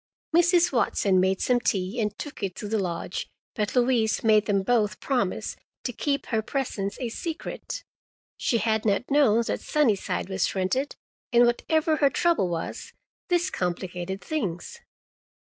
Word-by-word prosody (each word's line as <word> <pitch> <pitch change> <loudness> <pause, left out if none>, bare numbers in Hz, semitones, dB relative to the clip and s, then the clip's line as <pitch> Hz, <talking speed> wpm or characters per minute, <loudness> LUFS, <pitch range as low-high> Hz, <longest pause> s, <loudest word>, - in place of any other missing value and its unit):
Mrs. 350 0 +5
Watson 200 -6 +2
made 190 +1 +2
some 250 -1 +3
tea 200 0 -1
and 210 -1 -2
took 295 - -7
it 195 -2 -2
to 210 - -6
the 220 +1 0
lodge, 175 -1 -3 0.2
but 210 +2 -2
Louise 240 -4 +2
made 215 -2 +4
them 200 -2 +2
both 215 -1 +1
promise 245 -9 -1 0.3
to 245 - -3
keep 280 +4 -1
her 220 -3 0
presence 215 -5 -3
a 245 -3 -2
secret. 325 +7 -5 0.5
She 235 - +1
had 220 -1 +1
not 220 +4 0
known 255 -6 +4
that - - -2
Sunnyside 235 -14 +1
was 190 +1 -1
rented, 195 +10 0 0.4
and 240 0 +6
whatever 310 +6 +1
her 285 -2 +4
trouble 330 - +2
was, 165 -1 -5 0.3
this 355 0 +1
complicated 180 +1 -3
things. 305 - -3
225 Hz, 150 wpm, -26 LUFS, 195-275 Hz, 0.5 s, and